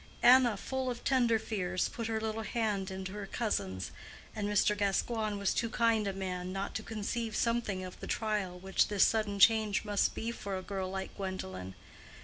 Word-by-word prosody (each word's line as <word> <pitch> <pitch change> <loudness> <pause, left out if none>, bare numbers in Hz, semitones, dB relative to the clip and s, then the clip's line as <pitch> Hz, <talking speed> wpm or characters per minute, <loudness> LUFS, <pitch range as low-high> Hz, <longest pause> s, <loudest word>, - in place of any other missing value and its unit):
Anna, 245 -3 +7
full 265 +4 -2
of 240 -1 -5
tender 240 -4 +3
fears, 185 -5 -1
put 230 -2 -4
her 220 -1 -1
little 220 0 -2
hand 210 -3 -1
into 190 0 -5
her 205 -1 -5
cousin's, 100 - -2 0.4
and 205 -1 -2
Mr. 210 0 +3
Gascoigne 210 +2 0
was 200 -1 +1
too 230 - 0
kind 225 -2 +2
a 195 - -1
man 185 -1 -4
not 195 +1 -3
to - - -2
conceive 220 +1 -3
something 230 -5 0
of 185 0 -8
the - - -7
trial 210 -5 -1
which 190 +1 +1
this 205 -2 +4
sudden 215 -2 +2
change 215 0 +4
must 205 -1 +1
be 230 +1 -2
for 200 -4 -4
a 185 - -6
girl 190 -1 -3
like 190 0 -5
Gwendolen. 95 - -5
205 Hz, 185 wpm, -32 LUFS, 190-225 Hz, 0.4 s, Anna